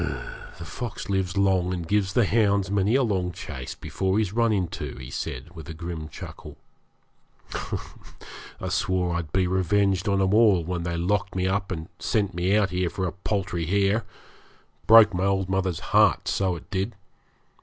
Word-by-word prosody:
'The 85 - -8
fox 120 +3 -6
lives 95 -2 -1
long, 95 -2 +2
and 85 -3 -4
gives 100 0 +1
the 120 - +4
hounds 100 -2 +2
many 100 +3 +2
a 135 - +4
long 95 -6 0
chase 70 -6 -7
before 95 +1 -1
he's 105 -3 0
run 115 0 +2
into,' 85 - -2
he 65 0 -9
said, 65 +9 -5
with 80 -3 -9
a 80 - -6
grim 80 -1 -6
chuckle. - - -10 1.0
'I - - -8
swore 90 -2 0
I'd 85 -3 -4
be 95 -1 +2
revenged 95 +2 +1
on 100 0 +2
'em 95 0 +2
all 105 -6 +5
when 90 +1 -3
they 85 0 -2
locked 95 +3 0
me 90 0 0
up 95 +1 -1
and 80 -2 -4
sent 100 -4 0
me 90 +4 +2
out 100 -4 +2
here 90 -1 0
for 95 - -3
a 90 - -1
paltry 95 -4 -2
hare; 100 +4 +2 0.8
broke 110 -2 +8
my 90 +2 0
old 95 -1 +1
mother's 95 -3 -1
heart, - - +4
so 95 -2 +1
it 85 - -11
did. 95 0 -2
95 Hz, 175 wpm, -25 LUFS, 85-100 Hz, 1.0 s, broke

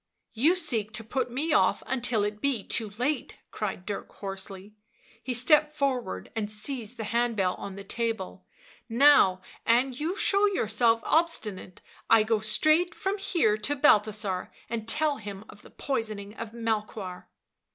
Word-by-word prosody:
You 295 +11 +3
seek 235 - +1
to 225 - -3
put 250 +2 -2
me 290 +6 -1
off - - +3
until 245 -4 0
it 210 0 -3
be 270 -7 0
too 220 -3 -1
late," 260 +2 -2
cried 195 -4 -4
Dirk 205 - -5
hoarsely 195 0 -7 0.2
— 225 - -30
he 255 - -3
stepped 300 +5 +4
forward 250 - -2
and 215 -2 -2
seized 230 +2 -3
the 225 - -4
hand 235 +2 0
bell 185 -3 +1
on 195 -1 -7
the 200 - -8
table 195 - -3
— - - -24
" - - -44
now 230 -7 +5 0.2
an' 250 +3 +2
you 315 +9 -3
show 405 +1 +4
yourself 230 - +2
obstinate, 220 - 0 0.3
I 225 -1 +6
go 220 0 +1
straight 310 +11 +3
from 405 -1 -2
here 330 - +1
to 280 +7 -1
Balthasar 210 -8 +2 0.2
and 225 -2 -4
tell 300 +4 +3
him 205 -1 -8
of 205 - -14
the - - -16
poisoning 215 -6 -4
of 230 -1 -7
Melchoir." 215 -5 -4
225 Hz, 165 wpm, -27 LUFS, 210-275 Hz, 0.3 s, I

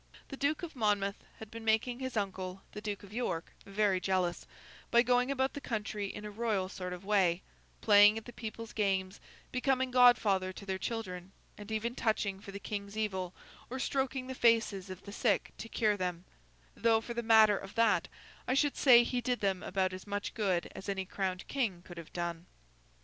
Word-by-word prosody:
The 275 - -5
Duke 285 +5 0
of 330 -3 -6
Monmouth 205 -4 0
had 220 -1 -10
been 230 0 -8
making 225 +3 +1
his 260 -3 -4
uncle, 190 -2 -3
the 210 - -7
Duke 205 -2 -4
of 200 0 -12
York, 200 -9 -2 0.2
very 200 -1 +2
jealous, 180 -2 -1 0.4
by 235 0 +5
going 250 +1 +2
about 265 -1 0
the 285 - -6
country 210 -4 -3
in 210 +2 -7
a 210 - -6
royal 205 -4 -1
sort 180 -1 -6
of 180 +1 -7
way, 190 -4 +2 0.4
playing 210 0 +7
at 225 - -6
the 240 - -10
people's 225 0 -7
games, 195 -2 0 0.3
becoming 260 0 +1
godfather 225 -7 +5
to 200 - -10
their 190 -1 -2
children, 190 -5 -5 0.2
and 210 +1 -10
even 225 +2 -1
touching 215 -5 0
for 195 - -10
the 200 - -6
King's 200 +1 -5
evil, 190 -4 -2 0.3
or 260 - -4
stroking 265 -1 -1
the 260 - -5
faces 225 -6 +2
of 185 0 -8
the 200 - -9
sick 205 -2 +1
to 225 - -7
cure 215 -3 +2
them—though, 170 - -2
for 235 - -6
the 235 - -2
matter 220 -2 +6
of 195 0 -8
that, 230 -2 +3 0.4
I 255 - +2
should 290 0 +2
say 240 -3 +7
he 245 +1 -1
did 245 0 -1
them 190 -2 0
about 185 -1 -1
as 185 +2 -8
much 205 0 -3
good 190 -6 0
as 195 - -7
any 190 -1 -2
crowned 185 -1 -3
king 210 -11 -1
could 175 -2 -10
have 165 - -11
done. 170 0 -4
210 Hz, 195 wpm, -32 LUFS, 190-235 Hz, 0.4 s, playing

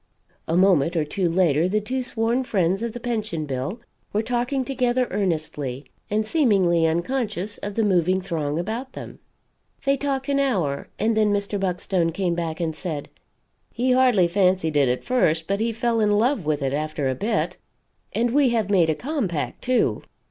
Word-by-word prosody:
A 165 - +1
moment 175 -4 +4
or 160 -2 +1
two 180 +3 -1
later 165 -2 +3
the 210 +3 +1
two 255 +5 -2
sworn 240 +1 0
friends 195 -4 0
of 235 -1 -3
the 240 - -6
Pension 215 -10 -2
bill 135 - -4 0.3
were 210 +2 0
talking 245 +3 -1
together, 255 -2 +1
earnestly, 155 -8 -2 0.2
and 215 +1 0
seemingly 195 - +3
unconscious 200 +3 -1
of 205 0 -5
the 225 - +2
moving 185 -2 +2
throng 160 -5 -2
about 225 +9 -4
them. - - -9 0.7
They 275 0 +3
talked 270 -1 -2
an 280 0 +1
hour, 185 - 0
and 220 +2 +1
then 215 -1 +3
Mr. 205 0 -1
Buckstone 180 -2 0
came 180 -1 0
back 165 -2 -3
and 160 -2 -2
said: 155 -6 -5 0.6
"He 255 +2 0
hardly 250 -8 +4
fancied 180 -3 +1
it 140 -3 +4
at 125 - -1
first, 165 -11 +1
but 200 +3 -1
he 230 +1 0
fell 230 +1 0
in 210 -1 +3
love 210 - +1
with 150 -2 0
it 135 0 -1
after 150 -1 -2
a 130 - +1
bit. 215 - -1 0.5
And 235 +1 0
we 280 0 +4
have 220 -4 0
made 175 -5 +4
a 160 - +2
compact, 220 - -3
too. 255 -1 +1
200 Hz, 180 wpm, -23 LUFS, 165-235 Hz, 0.7 s, moment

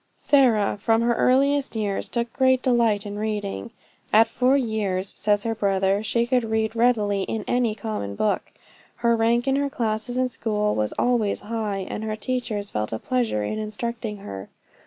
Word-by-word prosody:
Sarah, 235 -9 +3
from 225 +2 +2
her 235 0 +3
earliest 275 +2 +2
years 205 -3 -2
took 235 -1 -2
great 260 -1 +3
delight 230 -5 +2
in 205 0 -5
reading. 210 +1 -3 0.4
At 220 +1 +7
four 255 +4 +2
years, 210 -6 -1
says 205 +1 0
her 230 - -1
brother, 195 -2 +1
she 235 +2 +1
could 250 0 +1
read 220 0 -1
readily 215 -4 +2
in 210 +2 -3
any 245 -3 +1
common 200 - -4
book. 210 - -1 0.5
Her 235 0 +5
rank 235 +3 +2
in 270 0 +2
her 280 0 0
classes 235 -2 -2
in 255 0 +2
school 210 -3 -1
was 105 0 -1
always 235 -4 +1
high, 210 -3 -3
and 215 - -5
her 215 -1 -2
teachers 220 -3 -3
felt 105 0 -2
a 110 - -2
pleasure 235 - -1
in 215 - -3
instructing 215 0 -4
her. 95 - -7
220 Hz, 175 wpm, -24 LUFS, 205-240 Hz, 0.5 s, At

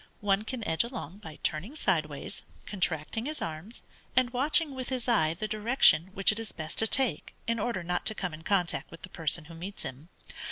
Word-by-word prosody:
One 200 0 +2
can 235 -2 -4
edge 160 - +4
along 220 - -7
by 160 -7 -10
turning 185 - -1
sideways, 155 - -1 0.2
contracting 185 - -1
his 305 0 -3
arms, 165 +8 -6 0.3
and 250 -1 +4
watching 290 +4 +3
with 260 -1 -4
his 255 -2 -2
eye 165 -10 +3
the 215 +5 -3
direction 210 - +4
which 195 +1 +4
it 210 - -3
is 225 -2 -5
best 155 -1 -3
to 225 - +5
take 265 +2 +2
in 230 0 0
order 205 -4 -1
not 175 +1 -1
to 220 - +2
come 180 -5 -3
in 155 - -8
contact 170 -6 0
with 165 - -12
the 185 - -4
person 160 -1 -1
who 165 - -11
meets 180 +5 -7
him. 135 +6 -7
195 Hz, 205 wpm, -29 LUFS, 160-235 Hz, 0.3 s, to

